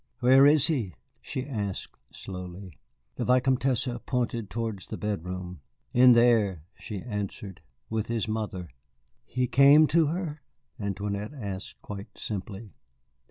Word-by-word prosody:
"Where 130 Hz, +3 st, +7 dB
is 150 Hz, -1 st, +5 dB
he?" 120 Hz, -, -1 dB, 0.3 s
she 130 Hz, -, -4 dB
asked 105 Hz, -8 st, -4 dB, 0.2 s
slowly. 90 Hz, -1 st, -8 dB, 0.4 s
The -, -, -1 dB
Vicomtesse 130 Hz, 0 st, +2 dB, 0.2 s
pointed 120 Hz, -4 st, -1 dB
towards 110 Hz, -5 st, -4 dB
the -, -, -5 dB
bedroom. 90 Hz, -4 st, -4 dB, 0.3 s
"In 125 Hz, 0 st, +8 dB
there," 115 Hz, -8 st, +3 dB
she 105 Hz, -3 st, -7 dB
answered, 100 Hz, -4 st, -5 dB, 0.3 s
"with 110 Hz, -1 st, -2 dB
his 115 Hz, -1 st, -1 dB
mother." 105 Hz, -5 st, -3 dB, 0.6 s
"He 125 Hz, 0 st, -1 dB
came 140 Hz, +5 st, +7 dB
to 165 Hz, -1 st, +4 dB
her?" 160 Hz, -2 st, -3 dB, 0.4 s
Antoinette 100 Hz, +4 st, -3 dB
asked 100 Hz, -6 st, -7 dB
quite 100 Hz, -1 st, -8 dB
simply. 100 Hz, 0 st, -6 dB
110 Hz, 120 wpm, -27 LUFS, 100-130 Hz, 0.6 s, In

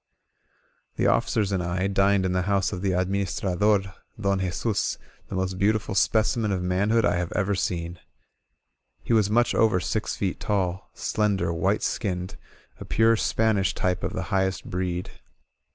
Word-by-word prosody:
The -, -, 0 dB
officers 105 Hz, -3 st, +2 dB
and 95 Hz, -2 st, 0 dB
I 90 Hz, +2 st, -1 dB
dined 100 Hz, 0 st, +2 dB
in 95 Hz, -, 0 dB
the 90 Hz, 0 st, +1 dB
house 100 Hz, -1 st, +1 dB
of 90 Hz, -, -4 dB
the 100 Hz, -, 0 dB
admims 95 Hz, +2 st, -1 dB
trader 100 Hz, +1 st, +1 dB, 0.3 s
Don 100 Hz, -1 st, +1 dB
Jesus, 95 Hz, +3 st, -1 dB, 0.3 s
the -, -, -6 dB
most 95 Hz, 0 st, -2 dB
beautiful 105 Hz, +1 st, +1 dB
specimen 110 Hz, +1 st, +2 dB
of 95 Hz, -2 st, -1 dB
man 90 Hz, +3 st, 0 dB
hood 115 Hz, -1 st, +3 dB
I 85 Hz, -2 st, +2 dB
have 90 Hz, -1 st, -2 dB
ever 100 Hz, -1 st, 0 dB
seen. 85 Hz, -2 st, -2 dB, 1.0 s
He -, -, 0 dB
was 105 Hz, -3 st, +3 dB
much 120 Hz, +3 st, +3 dB
over 110 Hz, -5 st, +3 dB
six 110 Hz, +4 st, -2 dB
feet 95 Hz, -3 st, -2 dB
tall, 95 Hz, -2 st, -1 dB
slender, 100 Hz, -6 st, 0 dB
white 95 Hz, +6 st, 0 dB
skinned 90 Hz, -4 st, -2 dB, 0.2 s
— -, -, -32 dB
a -, -, -6 dB
pure 115 Hz, 0 st, +3 dB
Spanish 110 Hz, -4 st, +1 dB
type 90 Hz, 0 st, -1 dB
of -, -, -2 dB
the 95 Hz, -, -3 dB
highest 95 Hz, -1 st, 0 dB
breed. 90 Hz, 0 st, -3 dB
95 Hz, 170 wpm, -25 LUFS, 90-105 Hz, 1.0 s, hood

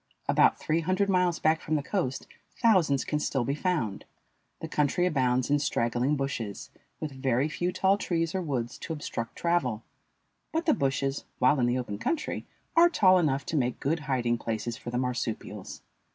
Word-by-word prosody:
About -, -, +4 dB
three 160 Hz, +2 st, 0 dB
hundred 185 Hz, +4 st, +1 dB
miles 180 Hz, -2 st, +2 dB
back 160 Hz, +1 st, +2 dB
from 155 Hz, -, -1 dB
the 145 Hz, -, 0 dB
coast 145 Hz, -8 st, -2 dB, 0.3 s
thousands 180 Hz, -, +3 dB
can 150 Hz, -, -1 dB
still 135 Hz, -3 st, 0 dB
be 135 Hz, -, -1 dB
found. 150 Hz, -, -1 dB, 0.6 s
The -, -, -5 dB
country 150 Hz, +4 st, +1 dB
abounds 130 Hz, -5 st, +1 dB
in 145 Hz, -, +4 dB
straggling 125 Hz, 0 st, +1 dB
bushes, 130 Hz, -7 st, -4 dB, 0.3 s
with 155 Hz, -, -4 dB
very 130 Hz, 0 st, 0 dB
few 175 Hz, +3 st, -2 dB
tall 190 Hz, +2 st, +2 dB
trees 165 Hz, -4 st, -1 dB
or 190 Hz, -, -1 dB
woods 130 Hz, -8 st, -3 dB
to 165 Hz, -, -4 dB
obstruct 115 Hz, -6 st, -5 dB
travel; 130 Hz, -11 st, 0 dB, 0.7 s
but 325 Hz, +1 st, -1 dB
the 310 Hz, -, +4 dB
bushes, 135 Hz, -, -1 dB
while 130 Hz, +3 st, +4 dB
in 120 Hz, -, +3 dB
the 120 Hz, +1 st, +1 dB
open 105 Hz, -5 st, -4 dB
country, 320 Hz, -, -2 dB, 0.3 s
are 340 Hz, +1 st, +7 dB
tall 185 Hz, -, +5 dB
enough 140 Hz, -5 st, 0 dB
to -, -, -3 dB
make 125 Hz, -4 st, 0 dB
good 160 Hz, +4 st, 0 dB
hiding 125 Hz, -5 st, 0 dB
places 115 Hz, +1 st, -3 dB
for 120 Hz, -, -8 dB
the 120 Hz, -, -2 dB
marsupials. 125 Hz, -3 st, -4 dB
140 Hz, 180 wpm, -28 LUFS, 125-175 Hz, 0.7 s, are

